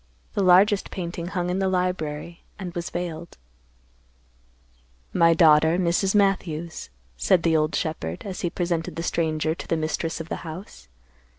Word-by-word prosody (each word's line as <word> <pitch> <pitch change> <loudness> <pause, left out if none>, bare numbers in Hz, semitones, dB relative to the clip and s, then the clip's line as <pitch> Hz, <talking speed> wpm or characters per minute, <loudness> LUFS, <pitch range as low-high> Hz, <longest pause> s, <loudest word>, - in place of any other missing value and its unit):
The - - 0
largest 195 +2 +5
painting 170 -2 -5
hung 180 -1 -2
in 185 - -1
the 190 -1 +1
library 170 -3 -2 0.2
and 185 -3 -6
was 175 -2 -4
veiled. 170 -1 -5 1.8
"My 165 0 +5
daughter, 160 0 +5
Mrs. 185 +2 +1
Matthews," 175 - 0 0.3
said 170 - +3
the 165 -1 +3
old 155 0 +1
shepherd, 85 - -3
as 195 -2 -5
he 175 - 0
presented 170 -2 -2
the 165 - -4
stranger 160 -2 0
to 170 - -9
the 165 - 0
mistress 160 +1 -2
of 165 - -6
the - - -3
house. 160 - -9
170 Hz, 155 wpm, -24 LUFS, 160-180 Hz, 1.8 s, largest